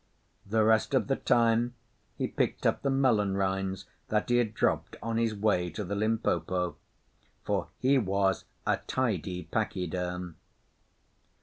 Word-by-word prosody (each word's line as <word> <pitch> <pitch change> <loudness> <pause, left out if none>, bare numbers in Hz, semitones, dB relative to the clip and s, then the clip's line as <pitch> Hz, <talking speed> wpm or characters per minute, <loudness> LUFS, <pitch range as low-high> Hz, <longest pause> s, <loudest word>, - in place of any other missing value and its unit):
The 110 +2 +2
rest 110 +4 +3
of 130 - +3
the 135 - +2
time 120 0 +2 0.4
he - - 0
picked - - -1
up - - +2
the 140 - 0
melon 115 -8 +2
rinds 95 -1 -1 0.2
that 105 +1 0
he 120 - +4
had 110 -3 0
dropped - - 0
on 115 0 -1
his 115 -2 +1
way 100 -4 +1
to 105 - -5
the 100 +1 -4
Limpopo 95 -5 0 0.7
for - - -1
he 135 +1 +3
was 95 -2 +1 0.2
a - - +2
Tidy 95 -8 -2
Pachyderm. 90 -2 -3
105 Hz, 140 wpm, -29 LUFS, 95-115 Hz, 0.7 s, he